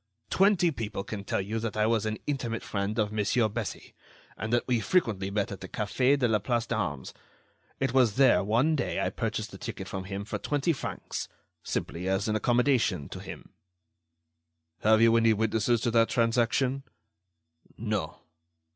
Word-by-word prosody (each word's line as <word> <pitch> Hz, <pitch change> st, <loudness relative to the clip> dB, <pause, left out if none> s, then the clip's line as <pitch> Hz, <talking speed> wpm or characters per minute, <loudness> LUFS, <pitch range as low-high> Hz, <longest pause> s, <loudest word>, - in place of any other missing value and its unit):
Twenty 190 Hz, -3 st, +4 dB
people 110 Hz, -7 st, -4 dB
can 100 Hz, -1 st, -6 dB
tell 100 Hz, -, -1 dB
you 110 Hz, +4 st, -3 dB
that 110 Hz, -1 st, -4 dB
I 105 Hz, -, +3 dB
was 110 Hz, -1 st, +1 dB
an 110 Hz, 0 st, -2 dB
intimate 125 Hz, -5 st, -2 dB
friend 100 Hz, +1 st, -2 dB
of 105 Hz, -2 st, +1 dB
Monsieur 110 Hz, +2 st, +2 dB
Bessy, 110 Hz, 0 st, -5 dB, 0.4 s
and 110 Hz, -, -4 dB
that 120 Hz, 0 st, +2 dB
we 125 Hz, -2 st, +2 dB
frequently 110 Hz, -, +1 dB
met 100 Hz, 0 st, -1 dB
at 100 Hz, -, -7 dB
the 95 Hz, -, -6 dB
Café 125 Hz, +6 st, +1 dB
de 125 Hz, -3 st, +2 dB
la 110 Hz, -2 st, +2 dB
Place 120 Hz, +2 st, -1 dB
d'Armes. 80 Hz, -, -3 dB, 0.7 s
It 135 Hz, -, 0 dB
was 125 Hz, -6 st, +4 dB
there, 130 Hz, -8 st, +5 dB
one 120 Hz, +10 st, +2 dB
day, 140 Hz, -, -1 dB
I -, -, 0 dB
purchased -, -, -3 dB
the -, -, -10 dB
ticket -, -, -6 dB
from 95 Hz, 0 st, -5 dB
him 100 Hz, +1 st, -5 dB
for 110 Hz, -, -4 dB
twenty 145 Hz, +3 st, 0 dB
francs—simply 90 Hz, -, -5 dB
as 95 Hz, +2 st, 0 dB
an 110 Hz, -, 0 dB
accommodation 120 Hz, -, +2 dB
to -, -, -7 dB
him." -, -, -9 dB, 1.3 s
"Have 110 Hz, +1 st, +4 dB
you 115 Hz, 0 st, +6 dB
any 115 Hz, -1 st, +4 dB
witnesses 110 Hz, +2 st, +1 dB
to 120 Hz, -, 0 dB
that 115 Hz, 0 st, +4 dB
transaction?" 120 Hz, +3 st, +1 dB, 1.0 s
"No." 105 Hz, -7 st, -3 dB
110 Hz, 170 wpm, -28 LUFS, 105-125 Hz, 1.3 s, you